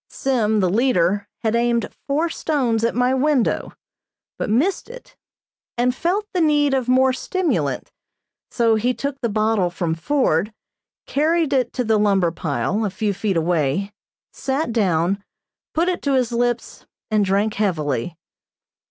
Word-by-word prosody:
Sim, 220 -5 0
the 185 - +2
leader, 200 -4 +2 0.2
had 225 0 +1
aimed 235 -2 +1 0.2
four 300 +4 +1
stones 260 -9 -1
at 230 - +1
my 250 +1 +2
window, 265 -2 +1 0.7
but - - -2
missed 300 - +1
it, - - -12 0.6
and 250 +1 +2
felt 365 +9 -1
the 360 - +1
need 295 -3 +3
of 260 -2 0
more 260 +1 +4
stimulant, 370 +6 -2 0.6
so 230 -2 +2
he 240 +3 +1
took 280 -1 -4
the 235 - 0
bottle 215 -3 +1
from 175 -2 -2
Ford, 200 - +1 0.5
carried 320 +1 +1
it 255 -3 +1
to 250 - -1
the 220 -2 +2
lumber 195 -5 +2
pile, 165 - -2
a 210 - 0
few 200 +2 -2
feet 195 -2 -1
away, 165 +3 0 0.4
sat 270 0 -2
down, 195 -3 +1 0.5
put 335 +3 +2
it 365 -1 -1
to 280 - 0
his 250 -2 +1
lips 240 0 -2 0.2
and 215 -1 +3
drank 200 +2 +1
heavily. 155 - -1
230 Hz, 150 wpm, -21 LUFS, 195-270 Hz, 0.7 s, more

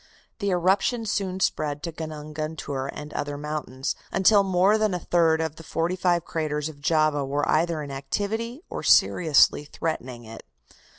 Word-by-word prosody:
The 200 -2 -1
eruption 195 +6 +1
soon 190 -3 -2
spread 150 -5 -1
to 170 - -3
Gunung 155 -1 -7
Guntur 145 -3 -4
and 150 0 -9
other 145 0 -3
mountains, 145 -3 -4 0.2
until 200 +2 +5
more 195 +2 +3
than 215 -4 +1
a - - -2
third 165 -2 +2
of 160 -1 -3
the 165 - -10
forty 165 +3 -1
five 175 -2 +1
craters 150 -2 -2
of 145 -2 -13
Java 155 -1 +2
were 145 +2 -1
either 160 -1 +1
in 140 - -7
activity 215 - -3
or - - -5
seriously 155 -3 +4
threatening 130 -5 -4
it. 115 0 -10
160 Hz, 165 wpm, -25 LUFS, 145-185 Hz, 0.2 s, until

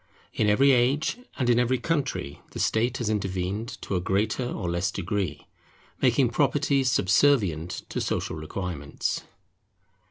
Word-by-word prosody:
In 105 - +2
every 135 +7 +5
age 135 - +2 0.2
and 130 - 0
in 120 0 +4
every 125 +1 +2
country 130 - -2
the - - -6
state 120 +3 +1
has 120 - -3
intervened, 100 +1 -2
to 100 - -2
a 90 - 0
greater 105 +7 0
or 95 -6 -4
less 85 +3 0
degree, 90 -4 -3 0.6
making - - +4
property 140 -1 +2
subservient 95 - +2
to - - -2
social - - -2
requirements. 80 -2 -4
105 Hz, 135 wpm, -26 LUFS, 90-125 Hz, 0.6 s, every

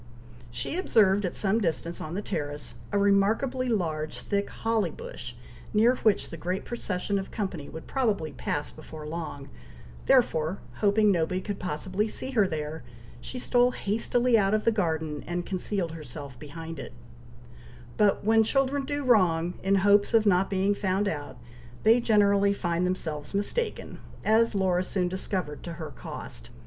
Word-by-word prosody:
She 120 - -3
observed 205 - +3
at 180 - -3
some 215 +3 +1
distance 170 -1 -2
on 155 +3 -5
the 205 - -3
terrace, 145 - -4 0.2
a 205 - +1
remarkably 220 +6 +2
large 160 -8 -1
thick 200 -1 -1
holly 225 -2 0
bush, 485 +1 -8 0.4
near 230 +4 +5
which 215 -3 +1
the 165 - -6
great 180 +4 -3
procession 200 -4 -2
of 190 - -6
company 190 -9 -4
would 160 - -8
probably 210 - 0
pass 145 +1 -3
before 155 0 -10
long, 150 -3 -5 0.6
therefore, 160 +4 +3 0.2
hoping 210 0 +4
nobody 180 0 +1
could 200 +1 -5
possibly 185 +5 -2
see 260 +4 -3
her 215 -6 +3
there, 155 -2 -4 0.4
she 255 - -6
stole 245 0 +3
hastily 230 +3 +2
out 195 +1 +3
of 215 - -1
the 230 - +5
garden, 160 -7 -1
and 175 0 -2
concealed 185 -2 -1
herself 140 -4 -8
behind 165 +2 -8
it; - - -8 1.0
but 210 -2 +3
when 225 +1 +5
children 270 +3 +1
do 290 +1 -2
wrong, 180 -8 +3
in 195 +1 +2
hopes 205 +2 +4
of 220 -1 +5
not 190 -1 +3
being 195 +1 +2
found 200 0 0
out, 145 -7 -4 0.5
they 225 +3 +6
generally 200 -3 +4
find 175 -2 0
themselves 160 -3 -3
mistaken, 435 - -2 0.3
as 225 0 +4
Laura 185 -2 +2
soon 185 -1 -1
discovered 180 -4 -3
to 170 - -6
her 160 -3 -7
cost. - - -8
195 Hz, 160 wpm, -27 LUFS, 165-215 Hz, 1.0 s, they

